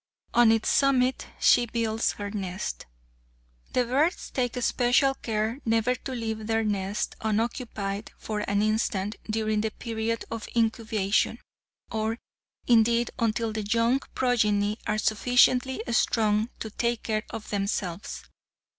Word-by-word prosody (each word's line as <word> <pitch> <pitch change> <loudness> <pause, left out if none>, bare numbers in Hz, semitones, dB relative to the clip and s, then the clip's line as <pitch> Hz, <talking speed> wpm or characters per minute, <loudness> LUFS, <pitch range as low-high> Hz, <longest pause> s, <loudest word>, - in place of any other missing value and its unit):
On 240 -2 +6
its 225 -1 +1
summit 260 -2 +2
she 240 - +5
builds 225 -1 0
her 205 -1 -6
nest. 185 - -4 0.9
The 250 - +2
birds 285 +9 0
take 250 -1 -1
especial 245 +2 +3
care 225 0 -2
never 225 +2 +2
to 260 +1 -6
leave 220 -3 -4
their 225 0 +1
nests 205 -1 -2
unoccupied 215 -2 -2
for 215 -1 -4
an 200 +1 +2
instant 215 -1 0
during 215 -1 0
the 220 - 0
period 225 0 -3
of 230 -1 -5
incubation, 225 -2 +1 0.5
or, 220 +1 -1 0.5
indeed, 235 0 +4
until 225 0 0
the 215 - -2
young 230 +5 +2 0.2
progeny 210 -4 +1
are 210 - +1
sufficiently 250 +4 +3
strong 220 -1 +2
to 220 - -5
take 235 +1 -1
care 215 -1 0
of 215 - -7
themselves. 195 -3 -3
225 Hz, 130 wpm, -27 LUFS, 215-240 Hz, 0.9 s, On